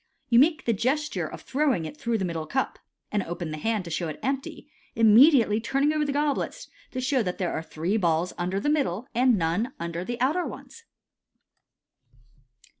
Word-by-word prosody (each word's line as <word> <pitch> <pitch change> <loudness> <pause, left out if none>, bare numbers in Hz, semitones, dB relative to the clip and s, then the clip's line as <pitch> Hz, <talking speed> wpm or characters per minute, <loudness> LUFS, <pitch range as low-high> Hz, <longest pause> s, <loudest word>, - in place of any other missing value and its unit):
You 235 -1 +6
make 310 +3 +3
the 230 - +2
gesture 280 +8 -1
of - - -9
throwing 265 - 0
it 155 -1 -7
through 230 +9 -1
the 190 - -1
middle 165 -3 -4
cup, 265 - -2 0.3
and 210 - +1
open 175 -2 -5
the 155 - -5
hand 220 0 -1
to 170 - -7
show 165 +2 -2
it 155 - -6
empty, 270 0 -3 0.3
immeuljtrly 225 0 +6
turn 275 +4 0
ing 300 +1 +3
over 305 -1 +1
the 285 - -1
goblets 295 - -1 0.2
to 255 - -5
show 255 0 +1
that 180 -4 -3
there 180 -2 -2
are - - -2
three 165 +5 -2
balls 170 -2 +1
under 180 +2 -2
the 200 - -3
middle 270 - 0
and 245 -1 +3
none 180 +10 -1
under 170 +1 -4
the 240 +5 -5
outer 300 +8 +1
ones. 460 0 -11
225 Hz, 190 wpm, -26 LUFS, 175-275 Hz, 0.3 s, You